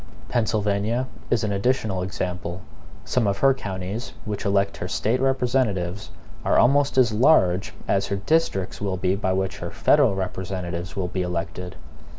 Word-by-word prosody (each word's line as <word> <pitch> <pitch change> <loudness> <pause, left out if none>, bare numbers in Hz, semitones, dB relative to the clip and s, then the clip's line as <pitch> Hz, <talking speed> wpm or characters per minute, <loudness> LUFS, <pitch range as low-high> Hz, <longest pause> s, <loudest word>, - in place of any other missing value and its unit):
Pennsylvania 110 0 0 0.2
is 120 - +2
an 105 - 0
additional 100 -2 0
example. 90 -1 -4 0.4
Some 120 -4 +1
of 100 -1 +1
her 135 +5 +5
counties, 100 0 -5
which 105 -2 -4
elect 100 0 +1
her - - -4
State 115 +4 0
representatives, 120 -8 0 0.3
are - - +2
almost 140 +2 +4
as 125 -3 +5
large 105 - +3
as 100 0 +1
her 100 - -1
districts 100 - 0
will 95 -2 -1
be 90 +1 +1
by 95 -2 -1
which 95 0 -2
her 85 - -4
federal 130 - +3
representatives 95 -2 -4
will 95 -2 -1
be 95 - -2
elected. 90 0 -4
100 Hz, 155 wpm, -24 LUFS, 95-120 Hz, 0.4 s, her